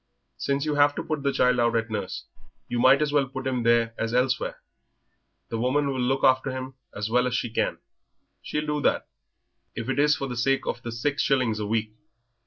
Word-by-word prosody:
"Since 140 +1 0
you 150 - 0
have 145 0 +4
to - - -3
put 155 -2 -3
the 140 0 +1
child 125 -2 +2
out 120 -1 +2
to 115 -1 -1
nurse, 95 -3 -4 0.4
you 120 - -2
might 130 +4 +6
as 145 -1 -2
well 140 -2 +3
put 130 0 -7
him 130 -2 0
there 115 0 +3
as 115 +1 -1
elsewhere; 125 0 +1 0.9
the 115 - -3
woman 140 +4 +1
will 130 -2 -2
look 135 +2 0
after 130 +1 +4
him 130 0 -5 0.2
as 105 +2 -4
well 125 +1 +3
as 125 - -1
she 120 -1 -2
can - - 0 0.6
she'll 150 0 -3
do 150 0 -1
that, - - +1 0.7
if 115 +2 -4
it 135 - 0
is 150 0 +4
for 135 - -4
the 125 -2 -5
sake 135 +3 +1
of 120 - -3
the 120 - -5
six 140 +6 -1
shillings 125 -6 +1
a 105 - -3
week." 110 0 -1
130 Hz, 215 wpm, -26 LUFS, 115-140 Hz, 0.9 s, might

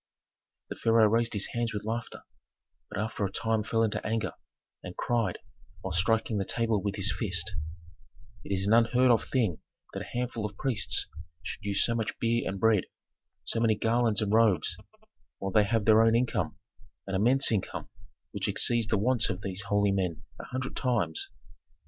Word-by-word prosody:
The - - -3
pharaoh 115 -1 +4
raised 115 +2 +1
his 100 -2 +2
hands 115 -2 -1
with 105 - -4
laughter, 115 +1 -4 0.7
but - - -6
after 110 0 -2
a 95 - -1
time 110 +2 0
fell 115 +2 +1
into 110 - -1
anger, 110 -4 -1 0.5
and 90 0 -9
cried, 115 -7 0 0.4
while 95 - -4
striking 110 +4 +1
the - - +1
table 115 0 0
with 100 0 -2
his 100 0 +2
fist, 90 -7 0 0.9
"It - - -8
is 95 0 0
an 105 - +3
unheard 120 +2 +5
of 115 - +3
thing 110 - +1 0.3
that - - -4
a - - -5
handful 120 -2 -3
of 105 0 -5
priests 125 -6 0 0.4
should - - -6
use 100 -1 +1
so 115 - 0
much 115 -2 -2
beer 115 0 0
and 95 0 -4
bread, 110 -3 +3 0.6
so 115 - -2
many 115 -2 +3
garlands 115 0 +1
and 105 0 -1
robes, 110 -6 +3 0.6
while 95 - -4
they 105 +2 +4
have 110 -1 0
their 110 0 +6
own 115 0 +4
income, 125 +1 0 0.5
an 95 - -5
immense 120 +8 +3
income, 105 -4 -2 0.4
which - - -3
exceeds 115 -2 +1
the 110 - +1
wants 115 +2 +2
of 95 +1 -4
these 95 -1 -2
holy 100 -1 +2
men 90 -4 -1 0.2
a - - -7
hundred 130 +1 -4
times." 110 - -1
110 Hz, 180 wpm, -29 LUFS, 100-115 Hz, 0.9 s, their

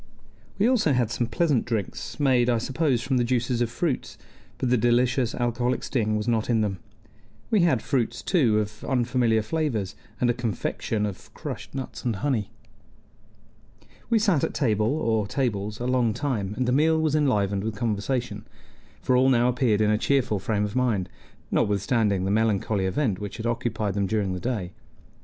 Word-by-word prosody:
We 205 - +3
also 225 - +3
had 120 -3 +1
some 120 -1 -1
pleasant 140 0 +1
drinks, 110 +1 -4
made, 125 -4 +3
I 120 - +3
suppose, 130 +1 0
from 130 -1 0
the 120 - +2
juices 120 0 0
of 120 - +1
fruits, 135 +3 -2 0.4
but 125 - -1
the - - +5
delicious 120 +1 +2
alcoholic 120 +1 -1
sting 110 -5 0
was 105 +2 -3
not 115 -1 0
in 115 -2 +3
them. 100 -3 -2 0.7
We 215 - +4
had 155 -10 +2
fruits, 120 -3 -1
too, 125 - +3
of 105 0 -3
unfamiliar 120 -3 +1
flavors, 115 -7 -2 0.2
and 125 - +2
a 120 - +3
confection 115 -2 -2
of 100 -3 -7
crushed - - -7
nuts 125 -4 -6
and 120 -3 0
honey. 110 -2 -1 1.6
We 230 - +4
sat 200 -9 +2
at - - -1
table 110 -5 +1
or 115 -7 0
tables 105 -3 -2
a 120 - -3
long 125 -4 +1
time, 105 -9 -2
and 130 -1 0
the - - +2
meal 160 +4 +3
was 155 -2 +1
enlivened 105 -9 +1
with 110 -1 -3
conversation; 110 0 -2 0.6
for 130 - +2
all 130 +1 +4
now 120 -1 +4
appeared 120 -4 +1
in 105 0 +3
a 105 - +2
cheerful 125 -7 +1
frame 105 +1 0
of 105 +2 -6
mind, 115 -8 +1 0.4
notwithstanding 100 -1 +1
the 95 - 0
melancholy 105 -2 +1
event 100 -2 0
which 105 0 -6
had 110 - -5
occupied 115 -3 -1
them 100 0 0
during 100 -2 0
the 90 - -4
day. 100 -4 -3
120 Hz, 180 wpm, -25 LUFS, 105-130 Hz, 1.6 s, the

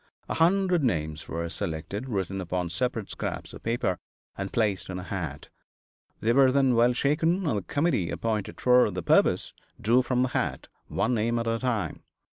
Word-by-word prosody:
A - - -2
hundred 180 0 +3
names 80 - -1
were 85 0 -3
selected, 85 +8 -4
written 95 -3 -2
upon 90 -1 -2
separate 115 +2 -2
scraps - - -5
of - - -10
paper, 115 -6 -1 0.4
and 95 0 -4
placed 105 -6 0
in 95 - -4
a 90 - -5
hat. 85 -7 -5 0.7
They 115 +2 +2
were 135 0 +6
then 135 -1 +3
well 120 +1 +4
shaken, 160 +8 +1
and 110 -10 +1
the - - -7
committee 140 - 0
appointed 110 -3 -2
for 125 0 +5
the - - -4
purpose - - +3 0.3
drew 120 +4 +4
from 125 0 +1
the 130 - 0
hat - - -2 0.2
one 125 - 0
name 115 +1 +1
at 115 - -1
a 115 0 0
time. 115 - -2
115 Hz, 180 wpm, -27 LUFS, 95-130 Hz, 0.7 s, were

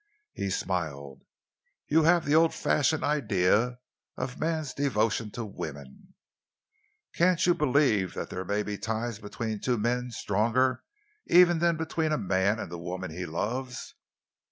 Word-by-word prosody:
He 100 - -3
smiled. 75 -8 -3 0.7
"You 160 +2 +4
have 170 0 +4
the 145 - +1
old 160 +1 +4
fashioned 155 +1 +1
idea 115 -3 +2 0.4
of 130 +1 -5
man's 155 -4 -1
devotion 115 -5 0
to 120 - -4
woman. 75 - -9 1.0
Can't 180 +1 +3
you 175 - +5
believe 130 - +2
that - - -5
there 90 - -4
may 105 +3 -1
be 105 -2 -5
ties 115 +1 -3
between 110 0 -4
two 125 +2 0
men 125 +3 -1
stronger 120 +4 +1 0.5
even 175 -1 +6
than 170 -1 +2
between 160 0 -1
a 150 - +2
man 95 +1 +1
and 110 - -6
the 85 - -6
woman 90 +1 -5
he 90 +2 -5
loves?" 125 +10 -4
115 Hz, 145 wpm, -28 LUFS, 95-150 Hz, 1.0 s, even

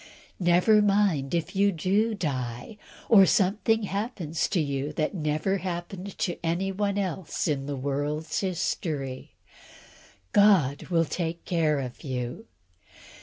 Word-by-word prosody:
Never 180 +4 +4
mind 195 -8 +2
if 170 +3 -2
you 200 +1 +4
do 200 +6 +1
die, 130 - -4 0.3
or 195 -5 +7
something 220 +2 +2
happens 195 - -2
to 185 - 0
you 140 -1 -2
that 155 +5 -1
never 155 +3 0
happened 180 +2 -6
to 175 - -3
anyone 195 +4 -1
else 185 -3 -2
in 140 -3 -1
the 145 - -3
world's 145 +3 -2
history; 155 -7 -3 1.0
God 185 -10 +4
will 165 -2 +2
take 170 +1 -4
care 160 -4 +1
of 125 +1 -7
you. 130 - -4
175 Hz, 120 wpm, -27 LUFS, 150-200 Hz, 1.0 s, or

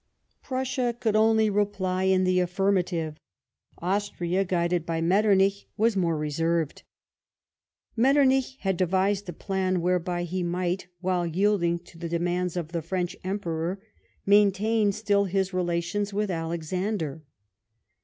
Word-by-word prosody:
Prussia 255 -2 -1
could 220 -3 0
only 220 0 +4
reply 195 -2 0
in 190 0 +3
the 185 0 +2
affirmative. 180 -4 0 0.6
Austria, 185 0 -1
guided 175 -2 0
by 165 0 -2
Metternich, 195 +2 +3
was 225 0 +2
more 170 -4 +1
reserved. 160 +1 -1 1.1
Metternich 265 +1 +3
had 190 -2 0
devised 190 +2 +1
a - - -4
plan 185 +1 -1
whereby 175 0 0
he 180 +2 -3
might, 180 +1 -2
while 180 -2 0
yielding 175 -1 +1
to 170 -1 -16
the 170 -1 -4
demands 175 +1 -1
of 165 -2 -4
the 170 -2 -2
French 180 +2 -2
Emperor, 185 -2 -2 0.5
maintain 205 +1 +3
still 200 -1 +1
his 190 0 -1
relations 180 +3 -1
with 205 0 -1
Alexander. 165 0 -3
185 Hz, 125 wpm, -26 LUFS, 170-205 Hz, 1.1 s, only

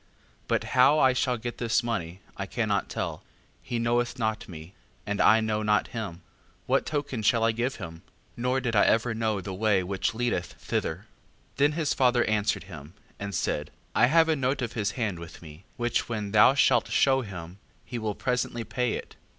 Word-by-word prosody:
5:2. - - -36
But - - +1
how 130 +4 +6
I 130 -4 +5
shall 125 0 0
get 120 +1 -6
this 120 +1 +1
money, 95 -6 -3
I - - -4
cannot - - -1
tell; - - -4 0.4
he 120 - -3
knoweth 120 +2 0
not 110 -3 -2
me, 80 +1 -10 0.3
and 105 -1 -1
I 110 0 +6
know 110 -1 -1
not 105 -1 +1
him: 100 -7 -6 0.4
what - - +1
token 145 -6 -2
shall 115 +1 +3
I 115 - +4
give 120 +4 -2
him? 80 0 -8 0.3
nor 125 +2 0
did 120 -3 -2
I 105 - +6
ever 115 +1 +2
know 110 -3 -1
the 95 +1 -6
way 100 -1 +2
which 95 +4 -2
leadeth 115 -7 -1
thither. 85 +5 -3 0.5
5:3. - - -35
Then 145 +2 +4
his 155 -2 0
father 125 -2 +3
answered 105 -5 0
him, 80 -2 -11 0.2
and 100 -2 -4
said: 75 -1 -1 0.2
I 120 - +5
have 160 +4 +5
a 160 - +2
note 135 -1 -1
of 120 -1 -4
his 105 -3 -1
hand 110 -8 -2
with 85 0 -10
me, 80 +3 -13
which 120 0 -1
when 105 -3 -3
thou 110 +5 +6
shalt - - +4
shew 135 -1 +3
him, 95 -4 -8 0.3
he 120 - -5
will 110 -2 -2
presently 125 -2 -1
pay 125 0 -1
it. - - -7
110 Hz, 200 wpm, -27 LUFS, 100-125 Hz, 0.5 s, how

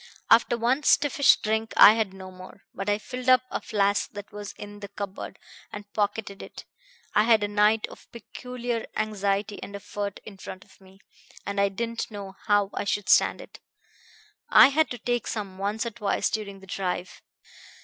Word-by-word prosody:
After 235 +1 +5
one 245 +5 +1
stiffish 285 -1 +4
drink 220 0 -1
I 210 - +10
had 220 -3 -1
no 190 -1 -10
more; 185 +2 -13
but 195 +2 -4
I 205 - +2
filled 250 +3 -5
up 255 0 +6
a - - -3
flask 200 -1 0
that 205 0 -9
was 205 -1 -7
in 205 0 -10
the 200 - -7
cupboard, 200 -1 -7 0.3
and 205 -1 -10
pocketed 205 -1 -2
it. - - -10 0.5
I 210 - +4
had 225 -2 +4
a - - +1
night 210 +2 +3
of - - -15
peculiar 240 0 -5
anxiety 205 -1 -1
and 200 - -8
effort 200 0 -5
in 200 -2 -10
front 185 0 -9
of - - -23
me, 190 +1 -19 0.4
and 200 0 -1
I 200 - +3
didn't 230 +3 -4
know 200 -3 -8
how 205 -1 +3
I - - -2
should 205 0 -2
stand - - +4
it. - - -13 0.9
I - - +8
had 315 +3 +2
to 245 - -5
take 240 -1 -2
some 195 -4 -5
once 205 +4 -2
or 235 - -3
twice 210 -2 -1
during 200 -3 -4
the - - -13
drive. 185 -1 -4
205 Hz, 185 wpm, -26 LUFS, 200-230 Hz, 0.9 s, I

